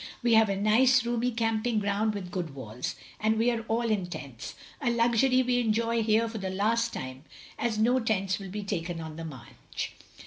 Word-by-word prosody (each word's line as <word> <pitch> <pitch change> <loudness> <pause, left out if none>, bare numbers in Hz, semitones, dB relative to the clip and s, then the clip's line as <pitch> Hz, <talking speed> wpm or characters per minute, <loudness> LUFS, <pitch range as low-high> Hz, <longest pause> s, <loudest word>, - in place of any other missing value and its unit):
We 240 -1 +4
have 220 -1 +6
a 195 - +1
nice 235 +5 +4
roomy 240 +1 0
camping 225 0 0
ground 210 +1 0
with 185 -3 -6
good 170 -6 -4
wells, 125 -2 -5 0.2
and 220 +1 +2
we 235 +2 +3
are 230 -1 -2
all 230 +2 +1
in 195 -4 0
tents, 135 -8 -8 0.3
a 255 - +1
luxury 240 +2 +3
we 250 0 +2
enjoy 230 0 +1
here 220 +1 +3
for 225 -1 -5
the 190 -1 -3
last 225 +5 +1
time, 130 +1 -6 0.4
as 230 -2 0
no 240 +4 +3
tents 200 -3 0
will 195 -2 -8
he 210 +1 -4
taken 175 -4 -3
on 160 -1 -7
the 165 +1 -6
march. 135 -7 -7
220 Hz, 200 wpm, -28 LUFS, 190-230 Hz, 0.4 s, have